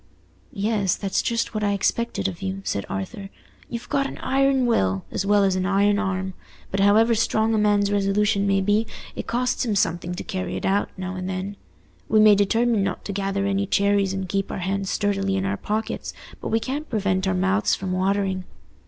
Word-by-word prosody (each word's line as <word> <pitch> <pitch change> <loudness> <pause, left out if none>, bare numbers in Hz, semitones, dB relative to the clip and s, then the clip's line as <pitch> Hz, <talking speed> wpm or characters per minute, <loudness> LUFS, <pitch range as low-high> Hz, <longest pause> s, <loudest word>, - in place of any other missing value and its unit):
"Yes, 200 -2 0
that's 195 -2 -1
just 230 0 -1
what 215 -1 -2
I 205 -1 +2
expected 230 +2 0
of 180 -2 -6
you," 195 0 -3
said 100 - -2
Arthur. 95 - -5 0.4
"You've 235 0 -6
got 275 -1 +1
an - - -8
iron 270 -1 +2
will, 95 - +1
as 195 - -2
well 205 0 +4
as 190 -1 +2
an 185 0 0
iron 200 +1 +3
arm. 190 -2 -2 0.4
But 195 - -1
however 215 +4 +5
strong 220 0 +1
a 220 - +2
man's 205 -1 +3
resolution 200 0 +2
may 195 0 +3
be, 205 +3 +2 0.3
it - - -5
costs 250 +1 0
him 225 -4 0
something 175 -1 0
to - - -5
carry 185 -1 -4
it - - -4
out, 200 +1 +1
now 185 0 -4
and 185 0 -4
then. 190 +2 -4 0.5
We 215 - +4
may 215 0 +8
determine 220 +2 +2
not 195 -2 -3
to 200 - -3
gather 195 0 -1
any 200 0 0
cherries 200 -1 +2
and 190 -1 -3
keep 195 +1 -2
our - - -4
hands 195 +1 -2
sturdily 195 -2 0
in 190 0 -1
our 195 +1 0
pockets, 215 +2 -3 0.3
but - - -4
we 225 - +1
can't 285 +6 -4
prevent 195 -4 0
our 95 - +1
mouths 95 +4 +2
from 185 +10 -4
watering." 190 0 0
200 Hz, 205 wpm, -24 LUFS, 190-215 Hz, 0.5 s, may